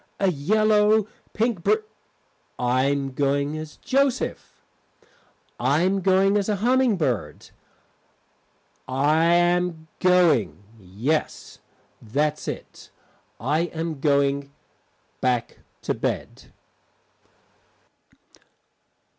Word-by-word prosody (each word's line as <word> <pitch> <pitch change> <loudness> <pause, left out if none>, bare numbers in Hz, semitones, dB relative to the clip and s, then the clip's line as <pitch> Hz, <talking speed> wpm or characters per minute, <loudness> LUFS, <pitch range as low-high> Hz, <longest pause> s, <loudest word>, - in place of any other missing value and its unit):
A 195 -2 +2
yellow 210 +6 +3 0.3
Pink 225 -4 -1
br - - +4 0.8
I 125 +1 +1
am 140 -1 -1
going 140 +2 0
as 155 -1 -8
Joseph. 270 -1 -1 1.0
I 140 +7 +2
am 190 +1 +1
going 195 +2 +3
as 205 0 -1
a 210 - +1
humming 245 +1 +2
bird. 120 - -3 1.4
I 145 +5 +2
am 175 -1 +2
going 165 - +3 0.2
yes, 110 - -3 0.4
that's 150 +7 -2
it, - - -8 0.5
I 150 +8 0
am 160 -2 -4
going 140 -1 +1 0.7
back 125 -2 -1 0.2
to - - -1
bed. - - -4
155 Hz, 90 wpm, -24 LUFS, 140-195 Hz, 1.4 s, br